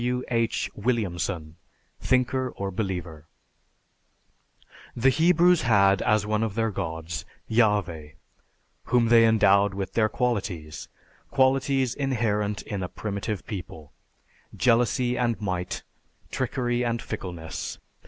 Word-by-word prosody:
(W. 125 Hz, +1 st, -1 dB
H. 115 Hz, -1 st, 0 dB
Williamson, 90 Hz, -8 st, -2 dB, 0.4 s
"Thinker 130 Hz, 0 st, +1 dB
or 100 Hz, 0 st, -3 dB
Believer.") 90 Hz, -6 st, -4 dB, 1.7 s
The 130 Hz, +3 st, +3 dB
Hebrews 175 Hz, +3 st, +4 dB
had 100 Hz, -4 st, +4 dB
as 105 Hz, -1 st, +2 dB
one 105 Hz, 0 st, 0 dB
of 110 Hz, -3 st, -2 dB
their 115 Hz, -1 st, 0 dB
gods, 80 Hz, -3 st, -4 dB, 0.2 s
Yahveh, 100 Hz, -9 st, +1 dB, 0.7 s
whom 120 Hz, -2 st, +2 dB
they 115 Hz, -1 st, +7 dB
endowed 100 Hz, -3 st, +4 dB
with 95 Hz, -1 st, -4 dB
their 110 Hz, -1 st, +2 dB
qualities; 95 Hz, -, -3 dB, 0.4 s
qualities 130 Hz, -1 st, +2 dB
inherent 110 Hz, -7 st, -1 dB
in 100 Hz, -2 st, -4 dB
a 90 Hz, -, -3 dB
primitive 100 Hz, -1 st, -4 dB
people: 85 Hz, -7 st, -8 dB, 0.6 s
jealousy 125 Hz, +1 st, +2 dB
and 120 Hz, -2 st, 0 dB
might, 90 Hz, -4 st, -3 dB, 0.5 s
trickery 125 Hz, -1 st, -1 dB
and 115 Hz, -1 st, -1 dB
fickleness. 85 Hz, -7 st, -6 dB
110 Hz, 110 wpm, -26 LUFS, 95-125 Hz, 1.7 s, they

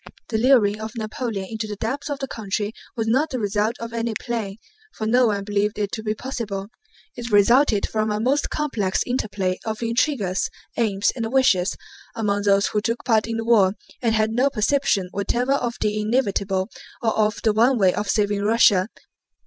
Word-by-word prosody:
The 220 Hz, -, 0 dB
luring 220 Hz, -4 st, +4 dB
of 220 Hz, +2 st, -6 dB
Napoleon 215 Hz, -2 st, -3 dB
into 220 Hz, 0 st, -4 dB
the 210 Hz, -, -5 dB
depths 265 Hz, +8 st, -3 dB
of 285 Hz, -, -2 dB
the 270 Hz, -1 st, -4 dB
country 210 Hz, -2 st, -3 dB, 0.2 s
was 225 Hz, -, 0 dB
not 265 Hz, +8 st, +2 dB
the 260 Hz, -, -3 dB
result 210 Hz, +1 st, 0 dB
of 230 Hz, 0 st, -6 dB
any 230 Hz, -1 st, -2 dB
plan, 225 Hz, -5 st, -3 dB, 0.4 s
for 220 Hz, -, -4 dB
no 245 Hz, +2 st, +4 dB
one 200 Hz, -2 st, -1 dB
believed 205 Hz, 0 st, -1 dB
it 205 Hz, -1 st, -2 dB
to 225 Hz, -, -4 dB
be 215 Hz, 0 st, -2 dB
possible; 215 Hz, -6 st, -5 dB, 0.5 s
it 240 Hz, -1 st, -6 dB
resulted 220 Hz, +2 st, +4 dB
from 215 Hz, 0 st, -1 dB
a 210 Hz, 0 st, -1 dB
most 265 Hz, +6 st, +1 dB
complex 225 Hz, -11 st, -1 dB
interplay 200 Hz, -7 st, -2 dB
of 220 Hz, +1 st, -4 dB
intrigues, 230 Hz, -5 st, 0 dB, 0.3 s
aims, 205 Hz, -4 st, +1 dB
and 230 Hz, -2 st, -3 dB
wishes 215 Hz, -8 st, +3 dB, 0.4 s
among 205 Hz, -3 st, 0 dB
those 200 Hz, 0 st, +4 dB
who 210 Hz, -, 0 dB
took 230 Hz, +2 st, -2 dB
part 225 Hz, -3 st, +2 dB
in 230 Hz, 0 st, -2 dB
the 225 Hz, -, -3 dB
war 205 Hz, -5 st, +4 dB, 0.3 s
and 230 Hz, -3 st, +2 dB
had 215 Hz, 0 st, +1 dB
no 250 Hz, +5 st, +2 dB
perception 215 Hz, -5 st, +1 dB
whatever 245 Hz, +6 st, 0 dB
of 240 Hz, -3 st, -1 dB
the 210 Hz, 0 st, 0 dB
inevitable, 200 Hz, -4 st, 0 dB, 0.3 s
or 225 Hz, -, +1 dB
of 215 Hz, 0 st, +1 dB
the 220 Hz, -, +3 dB
one 240 Hz, +4 st, +4 dB
way 190 Hz, -4 st, +4 dB
of 210 Hz, 0 st, -3 dB
saving 205 Hz, -1 st, +1 dB
Russia. 210 Hz, -3 st, +4 dB
220 Hz, 190 wpm, -23 LUFS, 205-235 Hz, 0.5 s, luring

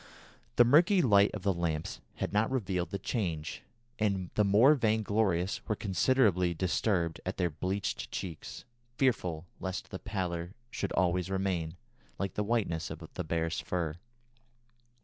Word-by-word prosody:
The 120 Hz, -, +7 dB
murky 175 Hz, -, +5 dB
light 100 Hz, -4 st, +5 dB
of 100 Hz, -, -6 dB
the 100 Hz, -1 st, +2 dB
lamps 80 Hz, -3 st, -2 dB
had -, -, -3 dB
not 105 Hz, +2 st, +2 dB
revealed 95 Hz, -9 st, -1 dB
the 100 Hz, -, -3 dB
change, 85 Hz, -8 st, -3 dB, 0.4 s
and 100 Hz, -4 st, 0 dB
the 105 Hz, -, +3 dB
more 105 Hz, +9 st, +6 dB
vainglorious 105 Hz, -, +1 dB
were 110 Hz, -, +1 dB
considerably 95 Hz, -3 st, +2 dB
disturbed 85 Hz, -1 st, 0 dB
at 95 Hz, -, -4 dB
their 90 Hz, -3 st, +1 dB
bleached 95 Hz, +6 st, -2 dB
cheeks, 85 Hz, -5 st, -6 dB, 0.3 s
fearful 90 Hz, -, +1 dB
lest 95 Hz, -1 st, -4 dB
the 95 Hz, -, -5 dB
pallor 90 Hz, -2 st, -3 dB, 0.2 s
should -, -, -3 dB
always 90 Hz, 0 st, +1 dB
remain, 95 Hz, -4 st, -1 dB, 0.4 s
like 100 Hz, -1 st, -2 dB
the 105 Hz, -, -1 dB
whiteness 100 Hz, -7 st, 0 dB
of -, -, -8 dB
the -, -, -3 dB
bear's 80 Hz, +1 st, -1 dB
fur. 85 Hz, -4 st, -2 dB
95 Hz, 145 wpm, -31 LUFS, 85-105 Hz, 0.4 s, The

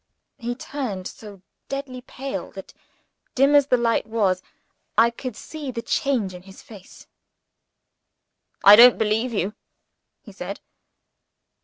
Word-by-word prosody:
He 240 Hz, +1 st, -4 dB
turned 240 Hz, -9 st, -5 dB
so 200 Hz, -4 st, -12 dB, 0.3 s
deadly 275 Hz, -2 st, -5 dB
pale 270 Hz, +2 st, -6 dB
that, -, -, -11 dB, 0.6 s
dim 275 Hz, +2 st, +4 dB
as 285 Hz, -1 st, +5 dB
the 250 Hz, -, +3 dB
light 230 Hz, -2 st, 0 dB
was, 200 Hz, -5 st, 0 dB, 0.6 s
I 230 Hz, +2 st, +5 dB
could 245 Hz, -1 st, -7 dB
see 300 Hz, +2 st, -8 dB
the 230 Hz, -2 st, -5 dB
change 235 Hz, -9 st, -1 dB
in 180 Hz, -, -10 dB
his 190 Hz, +1 st, -15 dB
face. 200 Hz, -4 st, -14 dB, 1.6 s
"I 200 Hz, +1 st, +10 dB
don't 240 Hz, +2 st, +8 dB
believe 220 Hz, +3 st, 0 dB
you!" 205 Hz, -2 st, -2 dB, 0.7 s
he -, -, -13 dB
said. -, -, -7 dB
235 Hz, 130 wpm, -23 LUFS, 205-260 Hz, 1.6 s, I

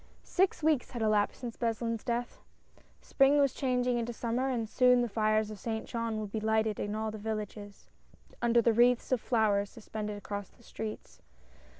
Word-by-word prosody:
S -, -, -14 dB
IX 375 Hz, -4 st, +3 dB
weeks 305 Hz, -5 st, +2 dB
had 235 Hz, -3 st, -4 dB
elapsed 210 Hz, +1 st, +1 dB
since 240 Hz, -2 st, -6 dB
Beslin's 230 Hz, -1 st, -2 dB
death. 240 Hz, 0 st, -3 dB, 0.6 s
Spring 275 Hz, +1 st, +3 dB
was 280 Hz, -2 st, +3 dB
changing 250 Hz, -2 st, 0 dB
into 235 Hz, +1 st, -2 dB
Summer, 240 Hz, +3 st, -1 dB
and 235 Hz, -4 st, -1 dB
soon 250 Hz, +2 st, +4 dB
the -, -, 0 dB
fires 215 Hz, 0 st, +1 dB
of 210 Hz, -, -8 dB
Saint 220 Hz, -1 st, -3 dB
Jean 230 Hz, -2 st, -3 dB
would 210 Hz, -2 st, -5 dB
be 220 Hz, -, -2 dB
lighted 220 Hz, -1 st, +1 dB
in 205 Hz, +1 st, -2 dB
all 220 Hz, 0 st, -2 dB
the 215 Hz, -, -7 dB
villages, 210 Hz, -1 st, -6 dB, 0.5 s
under 235 Hz, 0 st, +3 dB
the 230 Hz, -, +4 dB
wreaths 240 Hz, +2 st, +3 dB
of 255 Hz, -3 st, +2 dB
flowers 205 Hz, -4 st, +1 dB
suspended 210 Hz, -2 st, -6 dB
across 205 Hz, -1 st, -6 dB
the 235 Hz, -, -24 dB
streets. 220 Hz, -1 st, -7 dB
225 Hz, 185 wpm, -31 LUFS, 215-245 Hz, 0.6 s, soon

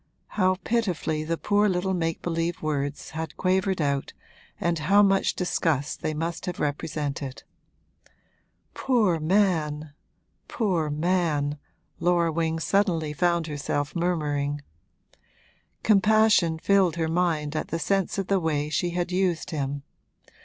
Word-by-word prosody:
how 185 Hz, -2 st, +2 dB
pitifully 180 Hz, -9 st, -1 dB
the 165 Hz, +2 st, -2 dB
poor 205 Hz, +3 st, +2 dB
little 190 Hz, +1 st, 0 dB
make 165 Hz, -2 st, -2 dB
believe 165 Hz, 0 st, -1 dB
words 145 Hz, -2 st, -2 dB
had 160 Hz, -1 st, -5 dB
quavered 190 Hz, 0 st, +1 dB
out 140 Hz, -2 st, -1 dB, 0.5 s
and 170 Hz, -1 st, 0 dB
how 200 Hz, +7 st, +5 dB
much 195 Hz, -1 st, +2 dB
disgust 160 Hz, -5 st, -1 dB
they -, -, -1 dB
must 165 Hz, +3 st, -4 dB
have 180 Hz, -, -4 dB
represented! 145 Hz, -2 st, -3 dB, 1.3 s
'Poor 215 Hz, -10 st, +2 dB
man 155 Hz, -4 st, +1 dB, 0.5 s
poor 180 Hz, -9 st, 0 dB
man!' 150 Hz, -2 st, 0 dB, 0.4 s
Laura 170 Hz, -1 st, +2 dB
Wing 165 Hz, 0 st, 0 dB
suddenly 165 Hz, -4 st, +1 dB
found 170 Hz, +1 st, +1 dB
herself 145 Hz, -1 st, -3 dB
murmuring: 145 Hz, -4 st, -1 dB, 1.2 s
compassion 210 Hz, -5 st, +4 dB
filled 190 Hz, -1 st, +3 dB
her 165 Hz, -1 st, -1 dB
mind 160 Hz, -3 st, 0 dB
at -, -, -2 dB
the 165 Hz, -, -2 dB
sense 195 Hz, +4 st, 0 dB
of 195 Hz, -, -1 dB
the 195 Hz, +1 st, +2 dB
way 150 Hz, -3 st, -1 dB
she 175 Hz, +3 st, 0 dB
had 175 Hz, +1 st, -1 dB
used 185 Hz, -1 st, 0 dB
him. 140 Hz, -2 st, -3 dB
165 Hz, 125 wpm, -26 LUFS, 150-185 Hz, 1.3 s, how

